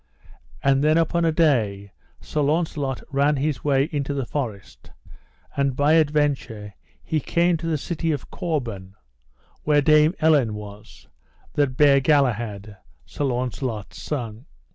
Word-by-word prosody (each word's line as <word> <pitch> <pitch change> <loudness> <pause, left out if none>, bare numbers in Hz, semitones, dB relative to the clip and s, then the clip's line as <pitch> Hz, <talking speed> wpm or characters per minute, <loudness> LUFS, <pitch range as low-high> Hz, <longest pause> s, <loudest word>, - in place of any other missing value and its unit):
And 135 0 +3
then 155 +1 +4
upon 165 +1 +1
a 165 - +3
day 110 - +1 0.3
Sir 150 - -3
Launcelot 145 -3 -1
ran 140 +2 +2
his 145 +1 -2
way 135 -2 +3
into 145 -2 -2
the 135 -3 -2
forest; 115 -9 -6 0.7
and 140 -2 0
by 145 +3 +3
adventure 145 -9 0 0.3
he 155 - -1
came 170 +4 +1
to 165 +1 -5
the 160 -2 0
city 165 +2 -2
of 145 -4 -5
Corbin, 115 - -4 0.7
where 145 -1 +2
Dame 155 +3 +4
Elaine 145 -9 +3
was, 105 0 -11 0.5
that 135 -3 0
bare 140 -2 +6
Galahad, 115 -8 0 0.3
Sir 145 - -4
Launcelot's 125 -4 -3
son. 120 -5 -5
140 Hz, 135 wpm, -23 LUFS, 120-155 Hz, 0.7 s, bare